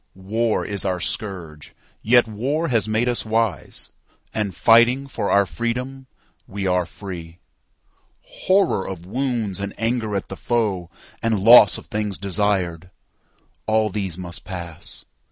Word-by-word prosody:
War 110 +4 -1
is 100 -1 -3
our 90 -2 -1
scourge; 75 0 -4 0.3
yet 120 +1 +4
war 135 +10 -1
has 115 -5 +1
made 110 +3 +1
us 120 -1 0
wise, 110 -1 -1 0.4
And, 100 -4 -2
fighting 120 +6 +5
for 130 -6 -3
our 100 0 +4
freedom, 125 +9 -4 0.4
we 100 0 -4
are 90 -2 +1
free. 85 -5 -8 0.9
Horror 190 - +1
of 90 -3 -7
wounds 115 -3 -2
and 100 0 -5
anger 115 -2 -1
at 100 - -2
the 95 - -7
foe, 100 -7 -1 0.3
And 115 -2 +1
loss 115 -2 +8
of - - -11
things 105 -2 -3
desired; 95 -3 -1 0.8
all 110 -1 +2
these 95 -4 -3
must 85 -3 -6
pass. 85 -3 -4
105 Hz, 135 wpm, -22 LUFS, 95-115 Hz, 0.9 s, loss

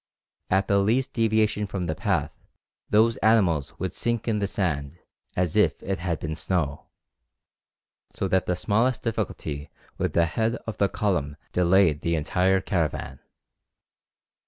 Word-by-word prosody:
At 95 +1 +2
the 100 0 +3
least 115 +7 +1
deviation 110 -2 +1
from 95 -2 -3
the 80 - -1
path - - 0 0.6
those 115 +2 +4
animals 95 -10 +2
would 95 -1 -3
sink 120 -1 -2
in 110 -2 +1
the 100 - 0
sand 80 -7 -2 0.4
as 90 -3 0
if - - +4
it 95 0 -2
had 85 -2 -2
been 80 0 -4
snow, 80 -4 -2 1.2
so 95 - -3
that 95 0 +1
the 90 - +1
smallest 115 +7 +1
difficulty 75 -10 -3 0.3
with - - -1
the 85 - +4
head 110 +7 0
of 110 -1 -6
the 100 - +3
column 75 -8 -1
delayed 90 -4 +3
the 85 0 0
entire 90 +5 +2
caravan. 85 -6 -2
95 Hz, 145 wpm, -25 LUFS, 85-110 Hz, 1.2 s, those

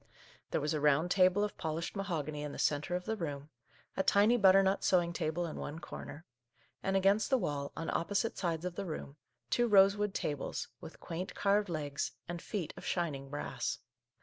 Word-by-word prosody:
There - - 0
was 150 +2 -1
a 150 - -1
round 150 +4 +3
table 185 +1 +4
of 210 - -3
polished 160 +4 -3
mahogany 155 -7 -3
in 150 -1 -5
the - - -7
centre 150 +4 0
of 180 - -3
the 220 - -1
room, 145 -5 -5 0.4
a - - +2
tiny 205 +4 +5
butternut 195 -2 +5
sewing 175 -2 +3
table 170 +1 -1
in 160 - -5
one 145 - -5
corner, 160 0 -8 0.6
and 195 0 +1
against 195 +3 +3
the 265 - +4
wall, 145 - -2
on 165 - -3
opposite 205 +6 0
sides 170 -2 -2
of 180 - -2
the 195 +2 -4
room, 150 -2 -6 0.3
two 240 0 +3
rosewood 200 0 +5
tables, 145 -2 -3
with - - -11
quaint 175 +3 -5
carved 205 0 +2
legs, 145 -4 -2
and 175 -1 -5
feet 185 -8 -4
of - - -10
shining 145 -6 -2
brass. 145 +1 -3
175 Hz, 185 wpm, -33 LUFS, 150-195 Hz, 0.6 s, tiny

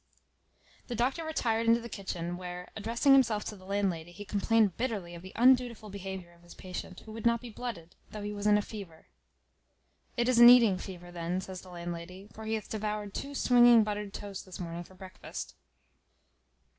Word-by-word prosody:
The 245 - -4
doctor 260 +8 0
retired 230 -8 0
into 230 +1 +5
the 235 - -7
kitchen, 175 -5 -4
where, 180 0 -7
addressing 230 +6 +3
himself 230 -6 +4
to 210 - -5
the 185 -2 -15
landlady, 190 -4 -1
he 205 +4 -9
complained 210 -1 +2
bitterly 210 -8 -3
of 170 - -9
the 185 +1 -10
undutiful 245 -3 +3
behaviour 190 -3 -7
of 170 - -22
his 175 0 -14
patient, 185 0 -7
who 220 - -11
would 225 0 -7
not 235 0 +3
be 240 0 -9
blooded, 205 -8 -6 0.2
though 210 -1 -7
he 205 0 -4
was 205 0 -2
in 210 0 +6
a 210 - 0
fever. 195 -8 -10 1.1
"It 240 0 +2
is 255 -2 +4
an 240 0 +11
eating 230 -7 +7
fever 175 -2 -9
then," 175 +1 -2
says 190 -1 -7
the 185 - -14
landlady; 175 +2 -7
"for 220 - -9
he 220 0 0
hath 215 - -5
devoured 210 -1 -3
two 280 +1 -5
swinging 240 -3 +6
buttered 210 -1 -3
toasts 200 -1 -7
this 185 - -10
morning 170 -1 -5
for 185 - -17
breakfast." 185 0 -8
205 Hz, 195 wpm, -30 LUFS, 180-230 Hz, 1.1 s, an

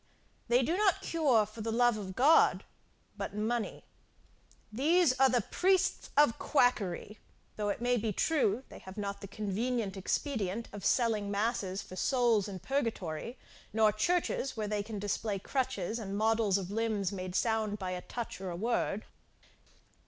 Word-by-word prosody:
They 245 +2 +4
do 325 +8 0
not 400 -3 +2
cure 275 -10 +3
for 215 +2 -10
the 225 +1 -2
love 240 0 +3
of 190 -3 -6
God, 295 +8 +5 0.5
but - - -5
money. 220 +2 -2 0.9
These 310 +4 +4
are 270 0 +6
the 245 -2 +2
priests 375 - +1
of 295 -5 +5
quackery, 210 - +1 0.4
though 210 -1 -1
it 220 - -3 0.2
be 220 -1 -1
true 255 - +1
they - - -11
have 190 +2 -11
not 200 -1 -4
the 200 - -7
convenient 210 +1 -2
expedient 215 +1 -2
of 205 - -7
selling 225 -4 +2
masses 200 -2 -1
for 185 - -10
souls 235 -3 +2
in 195 -2 -6
purgatory, 230 - -3 0.4
nor 215 -1 +4
churches, 275 +2 0
where 215 -1 -2
they 210 0 -1
can 210 +1 -6
display 205 +1 -2
crutches, 250 -1 -2
and 200 -2 -4
models 220 -2 +2
of 190 -1 -5
limbs 215 -3 0
made 185 -2 -5
sound 220 -2 +1
by 185 -2 -4
a 180 0 -4
touch 235 -3 -6
or 190 - -4
a 175 - -4
word. 215 0 -1
220 Hz, 160 wpm, -31 LUFS, 200-245 Hz, 0.9 s, are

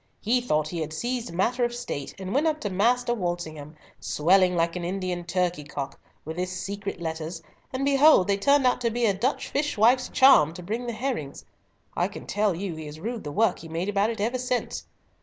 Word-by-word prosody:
He 245 +4 +1
thought 155 -10 0
he 170 - -4
had 155 0 -4
seized 240 +4 -3
matter 235 +8 0
of 240 0 0
State, 140 - -5
and 190 0 -5
went 295 +4 +2
up 310 -1 0
to 205 - -3
Master 240 +5 +2
Walsingham, 170 -7 -4 0.2
swelling 180 +3 +3
like 170 0 +1
an 180 - -4
Indian 180 -1 -3
turkey 175 -2 -1
cock, 140 -1 -6 0.3
with 160 +2 -6
his 180 +1 -2
secret 200 0 -5
letters, 165 0 -5 0.3
and 265 +1 -2
behold 280 - +6
they 200 -1 +2
turned 280 +6 +3
out 250 0 +2
to 235 - +2
be 235 +1 0
a 205 - +3
Dutch 240 +9 -1
fishwife's 255 -3 +2
charm 165 - +6
to 180 - -8
bring 225 +7 -3
the 235 - -2
herrings. 225 - -4 0.5
I - - +1
can - - -10
tell 205 -2 +1
you 185 0 -4
he 155 -1 -7
has 150 +1 -9
rued 230 +5 -4
the 145 - -5
work 225 +8 +2
he 165 - -10
made 170 +5 -2
about 205 +1 +2
it 230 - -4
ever 235 +5 0
since. 250 0 -2
195 Hz, 215 wpm, -26 LUFS, 170-240 Hz, 0.5 s, behold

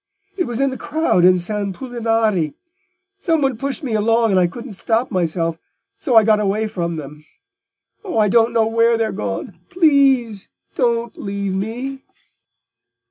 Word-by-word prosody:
It 360 -3 -1
was 240 0 -4
in 275 0 +2
the 260 - -7
crowd 300 - +1
in 185 0 +6
San 200 +2 -3
Pulinari—somebody 270 - -2
pushed 275 +6 -4
me 250 -5 -3
along 225 +1 +2
and 190 - +3
I 180 - +3
couldn't 235 +7 -9
stop 225 +5 -1
myself, 165 -3 -1 0.4
so 255 -6 0
I 225 - +8
got 215 0 +3
away 210 +2 0
from 170 -5 -3
them. 150 0 -9 0.8
Oh, 380 - -4
I 215 -1 +4
don't 230 +3 +3
know 230 -1 +2
where 230 +1 +2
they're 225 -1 -1
gone! 105 - -5
Please, 270 - +2 0.2
don't 235 -2 0
leave 200 -1 -3
me!" 245 +8 -4
225 Hz, 150 wpm, -19 LUFS, 195-265 Hz, 0.8 s, I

